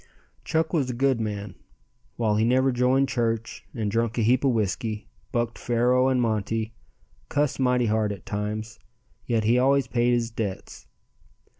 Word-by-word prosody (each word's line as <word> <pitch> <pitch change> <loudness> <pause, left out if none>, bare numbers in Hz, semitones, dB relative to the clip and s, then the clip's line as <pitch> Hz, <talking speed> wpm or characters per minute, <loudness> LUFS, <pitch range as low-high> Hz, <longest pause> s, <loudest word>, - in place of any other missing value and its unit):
Chuck 160 +1 0
was 140 -6 +1
a 125 - -3
good 130 -1 +2
man. 105 -3 -4 0.6
While 110 -3 +1
he 110 - +2
never 130 +3 +3
joined 130 +2 +2
church 115 -2 -2
and 110 -4 -2
drunk 115 +1 0
a 115 - +2
heap 125 +4 +3
of 135 - +4
whiskey, 110 -1 -1 0.2
bucked 120 -1 -1
faro 125 +2 +2
and 130 -1 +2
monte, 110 -1 -1 0.6
cussed 145 -3 0
mighty 125 -2 +2
hard 110 -1 +1
at 100 -5 -8
times, 110 +2 -4 0.5
yet 115 -3 +1
he 115 +3 +3
always 135 +1 +3
paid 120 0 +1
his 120 -1 0
debts. 105 -4 -5
115 Hz, 160 wpm, -25 LUFS, 110-125 Hz, 0.6 s, of